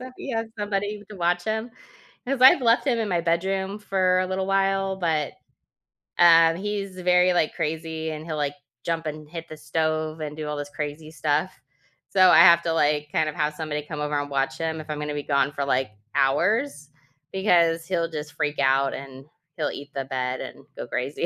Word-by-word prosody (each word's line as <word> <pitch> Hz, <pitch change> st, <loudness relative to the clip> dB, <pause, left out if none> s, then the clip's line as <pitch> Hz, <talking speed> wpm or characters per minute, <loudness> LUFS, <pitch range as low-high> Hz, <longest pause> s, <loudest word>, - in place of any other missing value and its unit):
so 255 Hz, 0 st, -8 dB
he 275 Hz, -, -6 dB
has 225 Hz, -1 st, -2 dB
somebody 205 Hz, 0 st, -2 dB
to 205 Hz, -, -9 dB
watch 175 Hz, 0 st, 0 dB
him, 220 Hz, +2 st, -2 dB, 0.6 s
'cause 270 Hz, -1 st, -1 dB
I've 260 Hz, 0 st, +8 dB
left 235 Hz, +4 st, +3 dB
him 240 Hz, -3 st, +2 dB
in 220 Hz, -, -1 dB
my 175 Hz, -2 st, +1 dB
bedroom 190 Hz, +4 st, -1 dB
for 185 Hz, -2 st, +2 dB
a 185 Hz, -, 0 dB
little 190 Hz, 0 st, -2 dB
while, 195 Hz, 0 st, +1 dB
but, 160 Hz, -5 st, -1 dB, 0.9 s
um, 165 Hz, -1 st, +7 dB
he's 200 Hz, -1 st, -4 dB
very, 180 Hz, 0 st, +4 dB
like, 160 Hz, -3 st, +1 dB
crazy, 160 Hz, 0 st, -3 dB
and 155 Hz, 0 st, -7 dB
he'll, 155 Hz, -2 st, -4 dB
like, 145 Hz, -1 st, -1 dB, 0.3 s
jump 165 Hz, -1 st, -2 dB
and 155 Hz, 0 st, -6 dB
hit 165 Hz, -1 st, -8 dB
the 155 Hz, -, -9 dB
stove 155 Hz, 0 st, -2 dB
and 150 Hz, 0 st, -5 dB
do 155 Hz, -1 st, -4 dB
all 150 Hz, -, -3 dB
this 145 Hz, 0 st, -5 dB
crazy 150 Hz, +1 st, -6 dB
stuff, 155 Hz, +4 st, 0 dB, 0.6 s
so 185 Hz, -1 st, +5 dB
I -, -, +7 dB
have 170 Hz, 0 st, +8 dB
to, 165 Hz, -, 0 dB
like, 150 Hz, -1 st, +1 dB
kind 155 Hz, -, +1 dB
of, 155 Hz, -, -4 dB
have 150 Hz, 0 st, 0 dB
somebody 150 Hz, -1 st, -4 dB
come 150 Hz, -1 st, -6 dB
over 150 Hz, 0 st, -1 dB
and 145 Hz, 0 st, -3 dB
watch 135 Hz, -1 st, -1 dB
him 160 Hz, -1 st, -2 dB
if 155 Hz, -, -10 dB
I'm 150 Hz, -1 st, -3 dB
gonna 150 Hz, 0 st, -3 dB
be 145 Hz, -1 st, -4 dB
gone 140 Hz, -1 st, +1 dB
for, 140 Hz, -1 st, -3 dB
like, 130 Hz, -4 st, 0 dB, 0.2 s
hours, 170 Hz, -, +1 dB, 0.4 s
because 170 Hz, -4 st, +3 dB
he'll 170 Hz, -2 st, -1 dB
just 150 Hz, -2 st, -6 dB
freak 145 Hz, -1 st, -2 dB
out, 135 Hz, 0 st, +3 dB
and 135 Hz, -1 st, -9 dB, 0.3 s
he'll -, -, -1 dB
eat 145 Hz, +1 st, -8 dB
the 135 Hz, -1 st, -3 dB
bed 130 Hz, -1 st, -2 dB
and -, -, -8 dB
go -, -, -6 dB
crazy. 125 Hz, +7 st, -2 dB
160 Hz, 205 wpm, -24 LUFS, 150-185 Hz, 0.9 s, I've